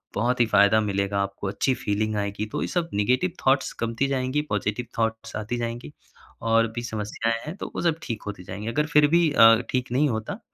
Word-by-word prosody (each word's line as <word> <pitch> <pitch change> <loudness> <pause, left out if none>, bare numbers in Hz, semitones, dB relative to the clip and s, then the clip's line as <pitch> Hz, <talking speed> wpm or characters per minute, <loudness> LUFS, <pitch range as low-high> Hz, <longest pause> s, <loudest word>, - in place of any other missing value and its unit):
बहुत 125 +4 0
ही 120 - +5
फ़ायदा 100 +1 +5
मिलेगा, 100 -1 -1
आपको 100 0 -4
अच्छी 115 +7 0
फीलिंग 110 0 -1
आएगी। 100 +1 -2
तो - - -2
ये - - -2
सब 170 -2 -1
नेगेटिव 125 - +1
थॉट्स 135 +1 +3
कमती 115 +4 0
जाएँगी, 135 +1 0
पॉज़िटिव 105 +3 -1
थाट्स 115 0 -2
आती 110 +3 -3
जाएँगी। 115 -9 -5 0.5
और 115 0 +4
भी 120 - -2
समस्याएँ 110 0 -2
हैं, 155 +4 -6
तो - - -6
वो - - -2
सब 165 -2 +1
ठीक 115 -3 -5
होती 100 -3 -6
जाएँगी। 95 +4 -7
अगर 150 +6 0
फिर 150 -2 +5
भी 170 +1 +3
अ, 115 -5 +8
ठीक 125 -1 -2
नहीं 140 +4 +2
होता, 110 - -4
115 Hz, 205 wpm, -25 LUFS, 105-130 Hz, 0.5 s, अ